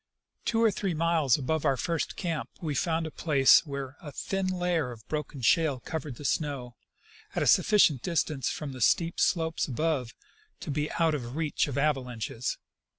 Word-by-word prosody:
Two 230 0 +2
or 225 - +5
three 190 -3 -2
miles 160 -5 +2
above 150 +2 -1
our 135 - +2
first 165 +3 -2
camp 165 -4 -3
we 155 -4 -3
found 160 +2 0
a 160 - -5
place 145 -1 +4
where 140 -1 -5
a 150 - -8
thin 195 +6 -2
layer 175 -6 0
of 115 -3 -11
broken 150 -4 -4
shale 150 +1 +3
covered 150 0 -5
the 145 - -10
snow, 135 -6 -2 0.6
at - - +1
a - - 0
sufficient 170 - +5
dis 170 +1 +1
tance 145 -4 -3
from 150 -3 -4
the 130 -1 -8
steep 165 +9 +2
slopes 160 -2 +1
above 135 -3 -1 0.5
to - - -4
be 150 +1 -1
out 165 -2 +2
of 150 - -1
the 120 - -7
reach 150 +5 -1
of 140 - -4
ava 145 -1 +2
lanches. 120 -1 -4
150 Hz, 190 wpm, -28 LUFS, 135-165 Hz, 0.6 s, or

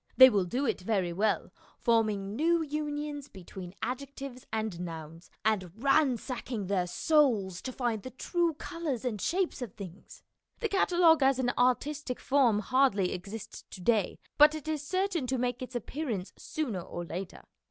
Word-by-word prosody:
They 260 0 +11
will 200 -4 +2
do 250 +10 -1
it 230 - 0
very 185 -3 0
well, 210 +4 0 0.3
forming 215 -4 +1
new 330 +4 +2
unions 295 -1 -3
between 185 -2 -10
adjectives 260 +1 -5
and 215 -5 -2
nouns, 165 -1 -7 0.2
and 195 -5 +1
ransacking 255 -4 +1
their 185 -2 0
souls 215 - +2
to 260 - -4
find 240 -4 -1
the 255 - -7
true 335 +5 0
colours 310 -6 -4
and 215 -6 -2
shapes 360 -5 0
of 235 -7 -6
things. 195 -1 -10 0.4
The 450 - -1
catalogue 350 -5 +4
as 265 -1 +4
an 245 -2 +1
artistic 255 +2 +1
form 250 -7 +3
hardly 215 -6 +2
exists 200 +4 -7
to - - -9
day, 210 0 +2 0.2
but 300 +1 +8
it 310 0 -7
is 310 -2 -1
certain 365 -2 -1
to 260 +1 0
make 245 0 -1
its 255 0 -7
appearance 240 -5 -3
sooner 245 - -3
or 175 0 -6
later. 180 +2 -6
245 Hz, 160 wpm, -30 LUFS, 200-290 Hz, 0.4 s, They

